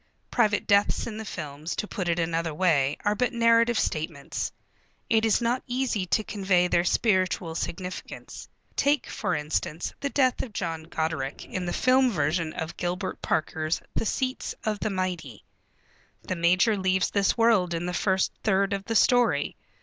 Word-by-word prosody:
Private 210 -4 +2
deaths 200 0 +3
in 220 -2 -6
the 220 - -6
films, 155 -3 -5
to - - -2
put 185 -4 -3
it 170 - +1
another 165 -1 -1
way, 150 -6 +2
are 205 - +3
but 250 +3 0
narrative 230 0 +4
statements. 155 -2 -2 0.6
It 225 0 +4
is 220 +2 +3
not 240 +2 +1
easy 245 -6 -1
to 215 - +1
convey 190 -4 +1
their 170 -1 +2
spiritual 185 -4 +1
significance. 180 +2 -6 0.3
Take, 285 +1 +2
for - - -2
instance, 150 +2 -2
the 280 - -2
death 260 -3 +2
of 235 - -7
John 165 -4 -3
Goderic, 160 -4 -3
in 180 -1 -4
the - - -1
film 255 0 +4
version 160 -3 0
of 160 +1 -5
Gilbert 180 +2 -3
Parker's 155 0 -1
The 225 - -1
Seats 260 +3 -2
of 215 -2 -1
the 215 - -1
Mighty. 180 - -3 0.8
The 185 - -3
major 180 +6 +3
leaves 190 -1 +1
this 200 +2 +2
world 215 -7 +3
in 165 +1 -3
the 180 - -3
first 190 +1 +1
third 200 0 +2
of 195 0 -3
the 225 - -2
story. 235 - +3
185 Hz, 165 wpm, -26 LUFS, 165-225 Hz, 0.8 s, narrative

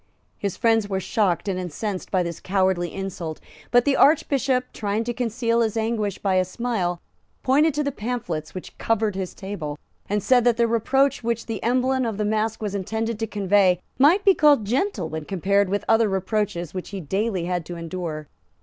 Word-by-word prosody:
His 200 -3 -3
friends 225 -3 +2
were 190 -1 0
shocked 195 -1 0
and 185 -2 -1
incensed 185 +3 -4
by 185 -2 +1
this 170 -1 -5
cowardly 185 -3 0
insult; 180 -5 -5 0.3
but 245 0 +4
the 285 -1 +3
Archbishop, 270 -4 +2
trying 210 +1 -1
to 240 +1 -3
conceal 235 -1 0
his 225 -1 0
anguish 220 -3 -1
by 190 -2 +1
a 185 - +4
smile, 185 -3 -2 0.4
pointed 290 +3 +3
to 300 - +1
the 285 - -1
pamphlets 210 - -4
which 185 - -8
covered 220 -2 +1
his 190 -1 -5
table, 170 -7 -5 0.3
and 205 0 0
said 250 -2 +4
that 240 -1 +3
the 235 -1 +3
reproach 265 +4 +1
which 230 0 -1
the 225 -3 -4
emblem 255 +2 +1
of 225 -4 -2
the 210 - 0
mask 220 +1 -1
was 205 -2 -2
intended 220 +3 -2
to 225 - -1
convey 195 -3 +3 0.2
might 330 +9 +5
be 390 - +7
called 290 - +4
gentle 245 - 0
when 160 0 -5
compared 200 +2 +1
with 205 +1 -1
other 225 -1 +4
reproaches 190 -3 -2
which 185 -1 -5
he 200 - -5
daily 190 +2 -1
had 180 -1 -1
to 175 - -6
endure. 165 -3 -5
210 Hz, 190 wpm, -23 LUFS, 185-235 Hz, 0.4 s, be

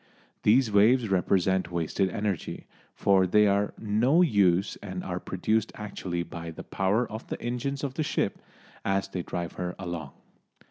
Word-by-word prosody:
These 115 +2 +4
waves 110 +3 +4
represent 95 -1 +2
wasted 85 +3 0
energy, 100 -2 -3 0.3
for 95 -2 +3
they 105 +3 +5
are 100 0 +2
no 120 +11 +3
use 100 - +3
and 95 -2 -6
are 90 -1 -3
produced 110 +5 -1
actually 95 -4 -4
by 85 0 -7
the 80 - -8
power 100 +6 0
of 110 +2 -8
the - - -5
engines 125 +4 -3
of 140 -2 -2
the 155 - -2
ship 150 - -1 0.4
as 95 0 0
they 90 - -3
drive 85 0 -4
her 90 0 -3
along. 85 -6 -5
100 Hz, 155 wpm, -28 LUFS, 90-110 Hz, 0.4 s, they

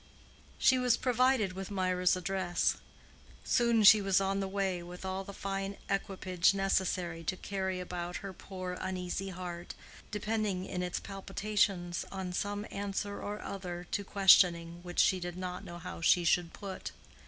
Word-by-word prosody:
She 260 -1 +4
was 250 -2 +3
provided 250 -5 +2
with 190 0 -6
Mirah's 185 -2 +2
address. 185 -1 0 0.7
Soon 235 -2 +3
she 210 +1 +9
was 195 -1 +3
on 195 0 0
the 195 - -1
way 190 -2 -1
with 180 +2 -9
all 190 +1 -2
the 200 - -8
fine 195 0 -4
equipage 190 -2 +1
necessary 185 -3 0
to 185 - -1
carry 190 -1 -3
about 175 -1 -4
her 195 - -5
poor 185 -1 -6
uneasy 185 +1 -3
heart, 175 -1 -6 0.3
depending 210 -3 -1
in 180 -2 -3
its 180 -1 -2
palpitations 195 -2 -1
on 190 -2 -4
some 205 +2 -2
answer 200 0 -3
or 210 +1 -5
other 180 -3 -5
to 200 - -1
questioning 175 -4 +5
which 175 0 -9
she 190 - +4
did 175 0 -5
not 180 -1 -5
know 175 - -8
how 180 0 -7
she 175 +1 +5
should 170 0 +2
put. 195 -2 -7
190 Hz, 155 wpm, -32 LUFS, 180-200 Hz, 0.7 s, she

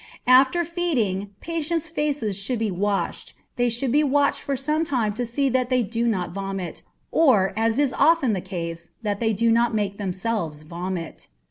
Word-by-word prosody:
After 260 +7 +5
feeding, 260 - -1
patients' 330 0 -2
faces 295 - -1
should 210 +6 -2
be 220 -2 -1
washed. 200 +2 -2 0.2
They 245 0 +2
should 240 +2 0
be 295 +3 +4
watched 285 0 +2
for 280 - -2
some 300 +4 0
time 240 -9 0
to 245 +2 -3
see 275 +4 0
that 255 -1 0
they 255 -2 +2
do 230 +2 -1
not 185 -6 -1
vomit, 195 -1 -5 0.3
or, 230 -13 +4
as 225 +1 +1
is 285 -3 +2
often 320 -8 +3
the 190 - -2
case, 170 -3 -6
that 205 -2 -1
they 225 -1 +1
do 230 +2 +2
not 235 0 +2
make 200 -1 -2
themselves 185 -5 -2
vomit. 170 +1 -6
230 Hz, 175 wpm, -24 LUFS, 195-275 Hz, 0.3 s, After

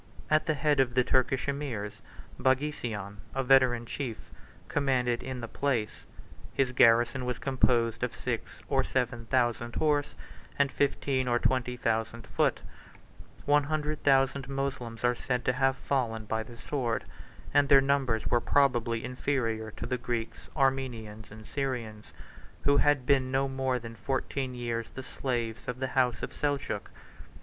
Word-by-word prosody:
At 155 0 +3
the 155 - +2
head 150 -1 +2
of 125 -2 +2
the 125 - +5
Turkish 130 +2 +1
emirs, 135 -8 -3 0.4
Baghisian, 125 -7 -1 0.2
a 135 - +1
veteran 125 -2 +4
chief, 120 -2 -5 0.4
commanded 130 -4 +1
in 130 -1 -5
the 115 - -4
place: 120 -5 -2 0.5
his 130 -2 +2
garrison 120 +1 +4
was 125 0 -2
composed 120 -5 +1
of 125 -1 -2
six - - -4
or - - +2
seven 120 -3 -2
thousand 120 -1 +1
horse, 145 -2 +1 0.4
and 140 -1 +3
fifteen 135 -2 0
or 120 -1 +3
twenty 125 0 0
thousand 115 0 -1
foot: - - +1 0.8
one 145 0 +4
hundred 155 0 -2
thousand 135 -1 +3
Moslems 130 -4 -3
are 120 0 +4
said 125 0 -2
to 125 - +3
have 135 +1 +2
fallen 120 -6 -1
by 110 +1 -1
the 115 +2 -10
sword; 120 -4 -2 0.5
and 145 -1 +4
their 140 - +9
numbers 135 -5 +1
were 120 - +2
probably 120 -4 +2
inferior 125 -4 -1
to 110 - -7
the 125 +1 -2
Greeks, 120 -1 -4
Armenians, 125 -6 -1
and 110 +1 -12
Syrians, 120 -6 -4 0.5
who 140 0 +4
had 145 -3 +3
been 135 -2 +3
no 135 +1 +1
more 130 -1 0
than 115 -1 -8
fourteen 130 +1 -2
years 115 -1 -3
the 130 - -8
slaves 120 -5 -3
of 125 0 -3
the 130 0 -1
house 125 -4 +2
of - - -4
Seljuk. 145 -2 -2
125 Hz, 155 wpm, -29 LUFS, 115-135 Hz, 0.8 s, their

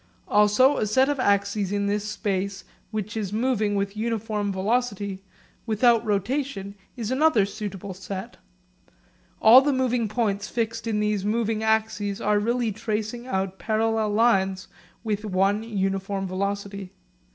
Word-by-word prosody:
Also 210 +7 +4
a 215 - 0
set 260 +6 +3
of 290 -2 -1
axes 200 -2 +1
in 205 0 0
this 205 0 0
space 195 -2 -2 0.3
which 215 -1 -4
is 205 -4 -3
moving 215 -2 0
with 200 0 -2
uniform 215 -2 -2
velocity 200 -1 -1 0.5
without 230 +1 +3
rotation 210 0 -2 0.2
is 230 -1 -3
another 265 -6 +4
suitable 200 -2 -6
set. 190 +1 -7 1.1
All 240 +4 +9
the 290 +1 +1
moving 250 -3 +1
points 205 -2 -1
fixed 230 -1 -3
in 210 -2 0
these 210 -2 0
moving 220 +1 0
axes 220 -2 0
are 210 -2 +2
really 235 +1 0
tracing 220 +3 -4
out 190 -3 -2
parallel 220 0 0
lines 195 -4 +2 0.4
with 210 -2 -2
one 200 +1 +1
uniform 195 -2 -2
velocity. 200 0 -4
210 Hz, 135 wpm, -25 LUFS, 200-225 Hz, 1.1 s, All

